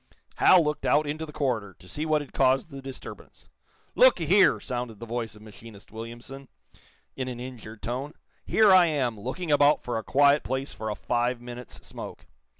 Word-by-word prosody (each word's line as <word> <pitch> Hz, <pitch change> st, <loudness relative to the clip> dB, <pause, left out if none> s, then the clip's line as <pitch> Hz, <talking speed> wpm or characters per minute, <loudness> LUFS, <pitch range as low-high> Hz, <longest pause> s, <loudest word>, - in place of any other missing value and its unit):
Hal 180 Hz, -2 st, +6 dB
looked 150 Hz, 0 st, -2 dB
out 150 Hz, +1 st, +3 dB
into 155 Hz, +2 st, -4 dB
the -, -, -9 dB
corridor 115 Hz, -, -2 dB
to 90 Hz, -, -17 dB
see 150 Hz, +9 st, -4 dB
what 155 Hz, -1 st, +2 dB
had 145 Hz, -, -11 dB
caused 135 Hz, +5 st, +2 dB
the 135 Hz, 0 st, -8 dB
disturbance. 135 Hz, -1 st, -11 dB, 0.4 s
"Look -, -, +5 dB
a -, -, -2 dB
here!" 190 Hz, +6 st, +4 dB
sounded 120 Hz, -4 st, -5 dB
the 115 Hz, -, -7 dB
voice 115 Hz, -2 st, -4 dB
of 105 Hz, -, -15 dB
machinist 110 Hz, -1 st, -14 dB
Williamson, 120 Hz, +5 st, -9 dB, 0.7 s
in 130 Hz, -1 st, -4 dB
an 125 Hz, -2 st, -6 dB
injured 115 Hz, -4 st, -9 dB
tone. 135 Hz, +6 st, -4 dB, 0.3 s
"Here 215 Hz, -2 st, +4 dB
I 180 Hz, -2 st, +7 dB
am, 130 Hz, -8 st, -1 dB
looking 150 Hz, -, -4 dB
about 145 Hz, 0 st, +4 dB
for 120 Hz, -2 st, -2 dB
a -, -, -8 dB
quiet 140 Hz, +3 st, +4 dB
place 130 Hz, +2 st, -4 dB
for 110 Hz, -, -5 dB
a 105 Hz, -, -3 dB
five 120 Hz, +2 st, -1 dB
minutes' 120 Hz, 0 st, -10 dB
smoke. -, -, -9 dB
130 Hz, 190 wpm, -26 LUFS, 115-150 Hz, 0.7 s, I